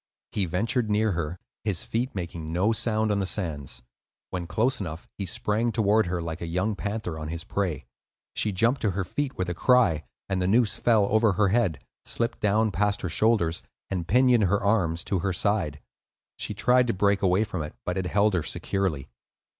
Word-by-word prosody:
He 100 Hz, -, 0 dB
ventured 110 Hz, +6 st, 0 dB
near 105 Hz, +1 st, +2 dB
her, 85 Hz, -1 st, -3 dB, 0.3 s
his 105 Hz, -5 st, -1 dB
feet 120 Hz, +2 st, -2 dB
making 85 Hz, -3 st, -5 dB
no 95 Hz, +6 st, +2 dB
sound 110 Hz, -1 st, +1 dB
on 100 Hz, -, +1 dB
the 95 Hz, -, -1 dB
sands. 75 Hz, -11 st, -3 dB, 0.5 s
When 90 Hz, -2 st, -3 dB
close 125 Hz, +8 st, +1 dB
enough 85 Hz, -4 st, -6 dB
he 100 Hz, -, -2 dB
sprang 110 Hz, +6 st, 0 dB
toward 110 Hz, -2 st, +3 dB
her, 85 Hz, -1 st, -2 dB
like 85 Hz, +1 st, -5 dB
a 85 Hz, -, -3 dB
young 90 Hz, +6 st, 0 dB
panther 100 Hz, -6 st, -4 dB
on 75 Hz, -, -5 dB
his 85 Hz, +1 st, -4 dB
prey. 90 Hz, -9 st, -2 dB, 0.5 s
She 105 Hz, -, +1 dB
jumped 115 Hz, +8 st, +2 dB
to 105 Hz, -, +1 dB
her 95 Hz, -, +1 dB
feet 135 Hz, +9 st, -3 dB
with 95 Hz, -, -1 dB
a 90 Hz, -, -1 dB
cry, 90 Hz, -7 st, +3 dB, 0.2 s
and 95 Hz, -1 st, -1 dB
the 90 Hz, -, +1 dB
noose 110 Hz, +2 st, +3 dB
fell 110 Hz, -4 st, +3 dB
over 110 Hz, -1 st, +4 dB
her 100 Hz, +1 st, +2 dB
head, 95 Hz, -, +1 dB, 0.2 s
slipped 115 Hz, 0 st, -1 dB
down 105 Hz, +1 st, +2 dB
past 105 Hz, +1 st, 0 dB
her 90 Hz, -, -2 dB
shoulders, 85 Hz, -3 st, +2 dB, 0.3 s
and 90 Hz, -4 st, -2 dB
pinioned 125 Hz, -2 st, +4 dB
her 100 Hz, +2 st, +1 dB
arms 90 Hz, -6 st, +1 dB
to 95 Hz, -, -1 dB
her 95 Hz, +1 st, -1 dB
side. 90 Hz, -7 st, 0 dB, 0.6 s
She -, -, -4 dB
tried 125 Hz, 0 st, +3 dB
to 115 Hz, -, +1 dB
break 100 Hz, +1 st, +2 dB
away 95 Hz, +2 st, +3 dB
from 95 Hz, -6 st, -4 dB
it, 75 Hz, 0 st, -6 dB
but 90 Hz, -, -1 dB
it 95 Hz, -2 st, -1 dB
held 105 Hz, +2 st, +2 dB
her 90 Hz, -, +2 dB
securely. 80 Hz, -4 st, -2 dB
100 Hz, 200 wpm, -26 LUFS, 85-110 Hz, 0.6 s, over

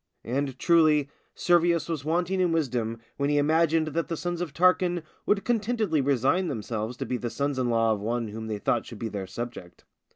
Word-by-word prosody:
And, 135 Hz, +2 st, -2 dB
truly, 155 Hz, -3 st, +3 dB, 0.2 s
Servius 170 Hz, -2 st, +2 dB
was 160 Hz, -5 st, -3 dB
wanting 175 Hz, +4 st, 0 dB
in 180 Hz, -2 st, +2 dB
wisdom 120 Hz, -8 st, -1 dB, 0.2 s
when 140 Hz, 0 st, 0 dB
he 145 Hz, -, +2 dB
imagined 160 Hz, +1 st, +2 dB
that 165 Hz, +2 st, -2 dB
the 165 Hz, -, -3 dB
sons 175 Hz, +1 st, -3 dB
of 175 Hz, -4 st, -3 dB
Tarquin 175 Hz, +1 st, +2 dB, 0.2 s
would 205 Hz, -1 st, +2 dB
contentedly 220 Hz, -, +1 dB
resign 140 Hz, +7 st, +2 dB
themselves 115 Hz, -3 st, -4 dB
to -, -, -3 dB
be 125 Hz, -, -2 dB
the 120 Hz, -, -4 dB
sons 140 Hz, +1 st, -2 dB
in 125 Hz, -1 st, 0 dB
law 115 Hz, -1 st, +3 dB
of 105 Hz, -, -3 dB
one 115 Hz, +2 st, -2 dB
whom 110 Hz, +1 st, -6 dB
they 110 Hz, -1 st, -3 dB
thought 115 Hz, +3 st, 0 dB
should 115 Hz, -, -9 dB
be 110 Hz, +1 st, -4 dB
their 100 Hz, -3 st, -5 dB
subject. 115 Hz, -3 st, -8 dB
145 Hz, 200 wpm, -27 LUFS, 120-170 Hz, 0.2 s, truly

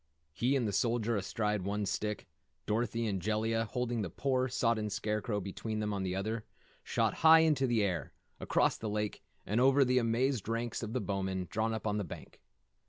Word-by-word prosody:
He 125 Hz, -, +1 dB
and 125 Hz, -5 st, +1 dB
the 100 Hz, -, -2 dB
Soldier 115 Hz, +1 st, +1 dB
astride 105 Hz, +1 st, -1 dB
one 100 Hz, +2 st, -2 dB
stick, 105 Hz, +2 st, -3 dB, 0.4 s
Dorothy 115 Hz, +1 st, 0 dB
and 100 Hz, -4 st, -1 dB
Jellia, 110 Hz, +3 st, 0 dB
holding 120 Hz, 0 st, -2 dB
the 95 Hz, -, -3 dB
poor, 130 Hz, -, 0 dB
sodden 115 Hz, -4 st, 0 dB
Scarecrow 105 Hz, 0 st, -1 dB
between 105 Hz, +3 st, -4 dB
them 105 Hz, -1 st, -1 dB
on 100 Hz, -, -2 dB
the 95 Hz, -1 st, -2 dB
other, 110 Hz, +3 st, -2 dB, 0.4 s
shot -, -, +1 dB
high 160 Hz, 0 st, +7 dB
into 150 Hz, -5 st, +3 dB
the 115 Hz, -3 st, +2 dB
air, 90 Hz, -5 st, -2 dB, 0.3 s
across -, -, +2 dB
the 110 Hz, -, -3 dB
lake 105 Hz, 0 st, -2 dB, 0.2 s
and 110 Hz, +5 st, +1 dB
over 135 Hz, +1 st, +5 dB
the 125 Hz, 0 st, +3 dB
amazed 120 Hz, 0 st, 0 dB
ranks 115 Hz, +1 st, -2 dB
of 110 Hz, -1 st, -5 dB
Bowmen 95 Hz, -2 st, -2 dB
drawn 110 Hz, +1 st, 0 dB
up 110 Hz, -1 st, -4 dB
on 105 Hz, 0 st, 0 dB
the -, -, -1 dB
bank. 85 Hz, -, -10 dB
110 Hz, 185 wpm, -32 LUFS, 105-120 Hz, 0.4 s, high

